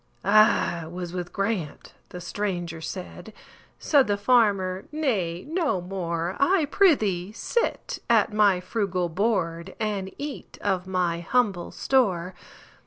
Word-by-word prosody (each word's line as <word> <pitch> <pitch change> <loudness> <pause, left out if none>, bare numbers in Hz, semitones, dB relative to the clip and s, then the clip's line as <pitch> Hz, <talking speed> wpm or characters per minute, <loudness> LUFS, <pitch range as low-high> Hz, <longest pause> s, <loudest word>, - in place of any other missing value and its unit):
"I 200 -5 +4
was 175 +1 -6
with 180 -1 -4
Grant"—the 190 -3 -4
stranger 175 -3 -3
said; 185 +4 -7 0.4
Said 285 -4 +3
the 205 -1 +1
farmer, 200 -5 +2
"Nay, 205 - -1
no 320 - 0
more,—I 185 - 0
prithee 210 - +3
sit 470 - -2
at 225 -2 +3
my 205 -3 +4
frugal 185 -4 -1
board, 180 -2 -1
And 200 -3 -2
eat 285 0 -7
of 190 -2 0
my 180 -2 0
humble 195 -1 0
store. 190 -9 +1
190 Hz, 110 wpm, -25 LUFS, 175-220 Hz, 0.4 s, I